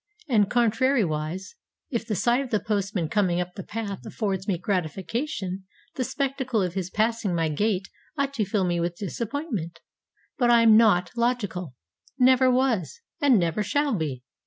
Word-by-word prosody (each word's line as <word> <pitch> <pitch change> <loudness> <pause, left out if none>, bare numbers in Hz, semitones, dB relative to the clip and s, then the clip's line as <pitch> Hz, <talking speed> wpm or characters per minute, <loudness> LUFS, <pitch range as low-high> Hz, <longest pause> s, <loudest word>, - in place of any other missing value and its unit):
And, 210 -7 +3
contrariwise, 210 - +1 0.4
if 230 -3 -2
the 215 - -1
sight 235 +7 +2
of 270 - -5
the 215 - +1
postman 200 -5 -1
coming 180 0 +1
up 180 0 -3
the 195 - -7
path 205 -1 -5
affords 195 -4 -3
me 190 -4 +1
gratification, 190 - -3 0.3
the 255 - -2
spectacle 265 -3 -1
of 180 -2 -2
his 185 -2 -3
passing 220 -2 0
my 165 -1 +1
gate 195 +4 0 0.3
ought 280 -1 0
to 225 -6 0
fill 200 0 0
me 175 -1 0
with 170 0 -1
disappointment. 210 - -4 0.6
But 245 -2 +3
I 235 -1 +6
am 220 -1 +7
not 205 -6 +4
logical, 205 - -1 0.4
never 260 0 +5
was, 250 - +1 0.2
and 275 -5 +5
never 170 +2 0
shall 285 +7 +1
be. 145 -8 -3
210 Hz, 160 wpm, -25 LUFS, 180-240 Hz, 0.6 s, am